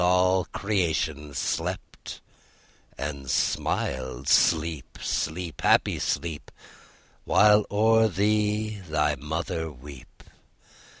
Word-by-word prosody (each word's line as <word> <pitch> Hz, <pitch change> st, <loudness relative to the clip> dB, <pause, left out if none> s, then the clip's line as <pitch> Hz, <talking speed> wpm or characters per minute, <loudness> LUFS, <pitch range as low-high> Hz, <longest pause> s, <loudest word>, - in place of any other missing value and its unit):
All 90 Hz, +1 st, +3 dB
creation 85 Hz, -7 st, -2 dB
slept -, -, -4 dB, 0.8 s
and 70 Hz, -2 st, -5 dB
smiled. 65 Hz, 0 st, -1 dB
Sleep, 80 Hz, -2 st, +2 dB
sleep, 85 Hz, +1 st, -3 dB
happy -, -, +3 dB
sleep, 80 Hz, 0 st, -3 dB, 0.7 s
While 105 Hz, 0 st, +4 dB
o'er 110 Hz, +2 st, +4 dB
thee 105 Hz, +2 st, 0 dB
thy 75 Hz, -1 st, +1 dB
mother 80 Hz, +3 st, -4 dB
weep. 70 Hz, -1 st, -13 dB
85 Hz, 80 wpm, -26 LUFS, 75-105 Hz, 0.8 s, While